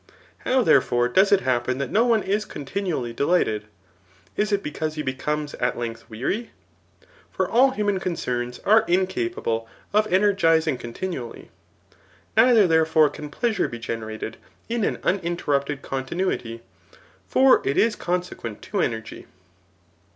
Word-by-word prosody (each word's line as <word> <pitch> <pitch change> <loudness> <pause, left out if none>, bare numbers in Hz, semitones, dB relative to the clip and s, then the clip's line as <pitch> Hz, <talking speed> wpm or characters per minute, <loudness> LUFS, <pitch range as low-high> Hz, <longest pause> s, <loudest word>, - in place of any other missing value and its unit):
How, 255 -1 +2
therefore, 120 - +3
does 190 +10 +4
it 200 -1 +5
happen 125 0 0
that 140 -2 -3
no 220 - +4
one 225 -3 +3
is 205 +2 0
continually 145 - -4
de 130 - -2
lighted? 110 -11 +1 0.7
Is 210 0 0
it 200 -1 +1
because 155 +1 -3
he 150 - -3
becomes 150 +3 -3
[at 125 - 0
length] 115 0 -6
weary? 135 - -3 0.8
For - - -1
all 255 +4 +5
human 205 -6 -1
concerns 125 -9 -3
are 220 +2 +6
incapable 185 - -1 0.3
of 215 +1 +3
energizing 165 -7 +3
con 120 -1 -8
tinually. 170 -11 -6 0.9
Neither, 225 -2 +6
therefore, 160 -2 +4
can 150 - -8
pleasure 225 +8 0
be 120 - -7
generated 110 -1 -5 0.3
in 230 -1 -1
an - - -1
uninterrupted 150 -6 -1
continuity; 130 -4 -3 0.6
for 265 0 +5
it 140 - -1
is 225 -1 +3
coiffiequent 175 -11 -4
to 200 - -2
energy. 110 -5 -4
160 Hz, 135 wpm, -24 LUFS, 125-200 Hz, 0.9 s, are